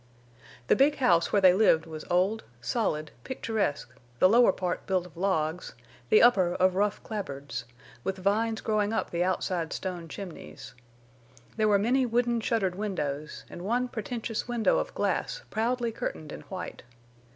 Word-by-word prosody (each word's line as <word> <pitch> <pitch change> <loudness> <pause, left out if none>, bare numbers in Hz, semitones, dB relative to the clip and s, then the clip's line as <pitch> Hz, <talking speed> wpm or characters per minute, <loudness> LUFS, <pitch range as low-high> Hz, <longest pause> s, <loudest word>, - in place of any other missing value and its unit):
The - - +4
big 285 +2 +4
house 175 -12 +3
where 200 -2 +2
they 185 -1 +8
lived 180 -5 +4
was 155 -1 -8
old, 190 +5 +2 0.2
solid, 155 - -1
picturesque, 210 - -2 0.2
the 185 - +6
lower 235 +1 +6
part 180 -1 -3
built 185 -2 +1
of 180 - -14
logs, 170 -2 -1 0.3
the 215 - +6
upper 190 -8 +5
of 185 0 +3
rough 205 +2 0
clapboards, 145 - -5 0.4
with 195 - -2
vines 220 +4 0
growing 215 0 0
up 225 - -1
the 170 0 +1
outside 180 -2 -1
stone 180 -3 -4
chimneys. 140 - -9 0.8
There 215 - +2
were 205 -1 +5
many 250 +5 +2
wooden 235 0 +1
shuttered 215 -5 0
windows, 155 -7 -4
and 175 - -9
one 240 +6 0
pretentious 225 0 -4
window 240 -2 +2
of - - -3
glass - - -1
proudly 235 +1 0
curtained 155 -8 -5
in - - -7
white. 185 -1 -6
195 Hz, 155 wpm, -28 LUFS, 175-225 Hz, 0.8 s, they